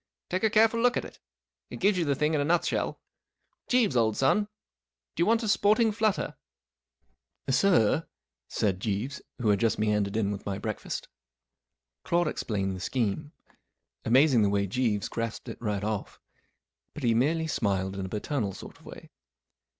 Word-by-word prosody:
Take 185 +3 -1
a 220 - +4
careful 225 +2 +4
look 245 0 +3
at - - -2
it. - - -12 0.5
It - - -8
gives 200 +1 +3
you 175 -2 0
the 140 -2 +1
thing 150 +3 +1
in 150 - +2
a - - +2
nutshell. 165 +3 0 0.7
Jeeves, 240 - +2
old 110 -3 +2
son, 135 +11 +3 0.7
do - - -2
you 170 - +3
want 230 +1 +3
a - - -2
sporting 215 +2 +3
flutter? 215 -1 0 0.5
" - - -49
44 135 - -1
Sir? 160 - +3 0.2
" - - -64
said 95 -3 -1
Jeeves, 110 +7 -3 0.2
who 115 -4 0
had 100 -1 +3
just 115 0 +1
meandered 105 -1 0
in 105 -2 +1
with 100 -1 -5
my 100 -1 -3
breakfast. 110 +1 -5 1.0
Claude 170 -1 +1
explained 95 -9 -2
the - - -7
scheme. 125 - -2 0.7
Amazing 130 +1 +4
the 100 - +3
way 100 0 +1
Jeeves 105 -1 0
grasped 115 -1 -4
it - - -8
right 105 -3 -2
off. 105 -1 -4 0.8
But 150 - -7
he 115 -2 +3
merely 155 +8 +1
smiled 100 -9 -1
in 95 - -4
a - - -9
paternal 105 0 -2
sort - - -11
of - - -21
way. - - -11
120 Hz, 180 wpm, -28 LUFS, 100-165 Hz, 1.0 s, a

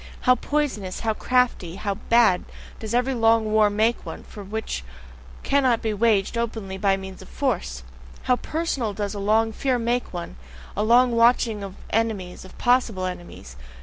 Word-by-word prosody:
How 255 - +5
poisonous, 250 -8 -2
how 225 -1 0
crafty, 240 -8 0
how 200 0 -2
bad, 220 -2 +3 0.4
does 220 +1 -3
every 250 +2 +1
long 225 -2 +3
war 215 -1 +4
make 220 +3 +1
one, - - -8
which 205 - -5 0.6
cannot 260 -4 +2
be 220 -1 0
waged 215 0 +1
openly 215 -5 -4
by 195 -1 +2
means 190 -1 -9
of - - -13
force! 65 0 -2 0.4
How 250 - +2
PERSONAL 280 -10 -2
does 205 0 -3
a 205 - -5
long 220 +2 +2
fear 260 +2 0
make 240 +1 -1
one, 170 - -6 0.4
a 205 - -1
long 240 +3 +5
watching 230 -2 +3
of 195 -1 -7 0.2
enemies, 210 -5 -1
of 190 - -14
possible 240 -6 +2
enemies! 175 - -8
220 Hz, 160 wpm, -24 LUFS, 195-240 Hz, 0.6 s, How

